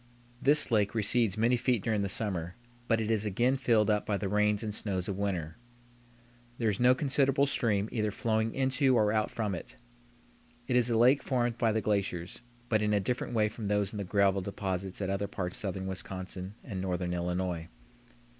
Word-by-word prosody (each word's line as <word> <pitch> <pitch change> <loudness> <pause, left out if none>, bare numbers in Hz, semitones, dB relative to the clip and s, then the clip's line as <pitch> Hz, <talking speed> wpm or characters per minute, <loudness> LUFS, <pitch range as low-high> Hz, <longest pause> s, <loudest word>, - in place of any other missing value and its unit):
This 145 -1 +3
lake 105 -1 +2
recedes 110 -1 +2
many 115 +3 +3
feet 120 -4 0
during 110 -2 0
the 100 - -1
summer, 90 -4 -1 0.3
but 115 -2 +2
it 110 0 -1
is 110 -2 +1
again 120 +6 +1
filled 115 -5 +2
up 105 0 +1
by 105 - -1
the 100 - -3
rains 105 +1 +2
and 105 -1 -3
snows 95 -4 -2
of 100 - -2
winter. 90 -5 -3 1.0
There 115 -2 +1
is 100 - -4
no 125 +1 +5
considerable 135 0 +2
stream 105 -7 +1
either 105 -2 0
flowing 110 0 -1
into 130 0 +2
or 105 -3 +3
out 110 0 +1
from 105 -4 -2
it. 95 +8 -7 0.9
It 125 - 0
is 125 -1 +3
a 115 - +2
lake 125 +5 +5
formed 120 -3 -1
by 115 -2 +3
the 110 +1 0
glaciers, 100 -4 -2 0.3
but 110 -3 +1
in 105 0 +1
a 105 - +3
different 120 +3 -2
way 105 -1 +3
from 105 +1 -7
those 105 -1 +1
in - - -5
the - - -2
gravel 100 0 +2
deposits 95 0 -4
at 95 - -1
other 100 +1 -1
parts 90 -2 -4
of - - -3
southern 95 -2 -3
Wisconsin 95 +1 -6
and 95 -6 -5
northern 90 -1 -2
Illinois. 90 -1 -2
105 Hz, 200 wpm, -30 LUFS, 95-115 Hz, 1.0 s, no